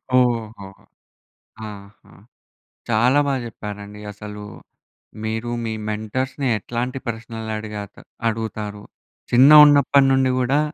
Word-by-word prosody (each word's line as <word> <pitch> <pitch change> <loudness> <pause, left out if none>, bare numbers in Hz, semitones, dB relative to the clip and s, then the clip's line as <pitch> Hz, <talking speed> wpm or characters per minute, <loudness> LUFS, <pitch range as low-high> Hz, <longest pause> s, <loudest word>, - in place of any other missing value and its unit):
ఓహోహో! 115 -5 +1 1.0
ఆహా! 100 0 -13 0.8
చాలా 120 +5 +3
బా 140 - +1
చెప్పారండి. 105 -2 -8
అసలూ, 105 0 -9 0.8
మీరు 110 +2 -3
మీ 110 - -2 0.2
మెంటర్స్‌ని 130 +6 -2
ఎట్లాంటి 120 +5 -4
ప్రశ్నలు 110 -1 -5
అడిగాక 105 -2 -7 0.3
అడుగుతారు? 110 -2 -4 0.5
చిన్న 130 +4 +7
ఉన్నప్పడ 145 -1 +5
నుండి 130 -1 +3
గూడా 135 +4 +2
110 Hz, 95 wpm, -21 LUFS, 105-125 Hz, 1.0 s, చిన్న